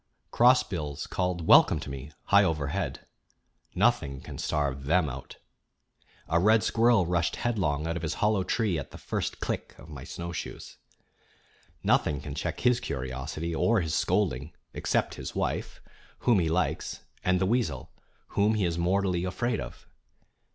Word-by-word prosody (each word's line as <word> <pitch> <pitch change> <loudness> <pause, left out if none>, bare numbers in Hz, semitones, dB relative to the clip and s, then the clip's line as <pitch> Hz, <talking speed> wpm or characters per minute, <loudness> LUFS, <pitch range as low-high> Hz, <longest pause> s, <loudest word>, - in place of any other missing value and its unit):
Crossbills 95 - +2
called 90 -3 -2
welcome - - +6
to - - -7
me, 70 +2 -7
high 100 0 +5
overhead. 75 -6 -2 0.7
Nothing 70 -1 +2
can - - -9
starve 70 -3 -1
them 80 +2 +3
out. 65 0 -8 0.9
A 85 - +2
red 110 +4 +4
squirrel 115 -4 +3
rushed 85 -1 0
headlong 80 -11 -1
out 85 +1 -1
of - - -5
his 80 - -2
hollow 105 -2 +2
tree 95 -3 0
at 70 - -7
the - - -11
first - - -3
click - - -4
of 70 - -14
my 70 -3 -8
snowshoes. 85 +4 -7 1.1
Nothing 75 - +2
can 70 +1 -7
check - - -3
his 125 -1 +3
curiosity 70 - -4
or 110 +6 +2
his 80 -2 -2
scolding 85 -6 0 0.2
except - - 0
his - - -6
wife, - - -3 0.4
whom 120 -5 +4
he 80 -2 +1
likes, 90 +3 -1 0.2
and 90 0 +2
the 95 - +2
weasel, 100 - -1 0.4
whom 105 +2 +2
he 105 -3 +1
is 85 -1 -1
mortally 90 0 +1
afraid 110 +6 -1
of. - - -8
85 Hz, 150 wpm, -28 LUFS, 75-100 Hz, 1.1 s, welcome